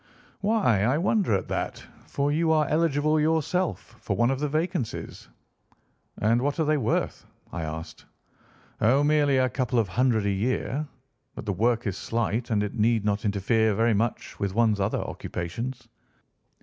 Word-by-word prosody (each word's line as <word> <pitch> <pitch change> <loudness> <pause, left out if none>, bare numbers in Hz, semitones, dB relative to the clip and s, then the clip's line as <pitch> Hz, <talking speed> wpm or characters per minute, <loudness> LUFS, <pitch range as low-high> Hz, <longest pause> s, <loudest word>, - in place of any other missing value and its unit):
"'Why, 200 - +2
I 125 +8 +2
wonder 185 - +2
at 95 - -2
that, - - -3 0.2
for 140 +1 0
you 160 +2 +2
are 155 -2 +3
eligible 155 -1 +2
yourself 160 -4 0
for 100 - -2
one 120 +5 +2
of 135 - -2
the 150 0 -1
vacancies.' 155 - -3 0.9
"'And 115 +3 +2
what 145 +4 -1
are 160 - +2
they 155 +1 +2
worth?' 115 -5 -1 0.3
I 85 - -3
asked. 80 +1 -6 0.8
"'Oh, 125 +6 +4
merely 145 -2 +3
a 130 0 +3
couple 125 -1 -1
of 110 -5 +2
hundred 115 +1 +2
a 100 - +2
year, 130 +8 -1 0.5
but - - -7
the 100 - -1
work 115 +5 +1
is 95 -3 -2
slight, 115 0 -2
and 105 -2 +1
it 105 - -4
need 115 -1 +1
not 105 +1 0
interfere 105 +2 +2
very 115 +2 +3
much 110 +3 -2
with 100 -1 -2
one's 110 -3 +3
other 100 +2 0
occupations. 115 +9 -5
120 Hz, 165 wpm, -26 LUFS, 105-145 Hz, 0.9 s, Oh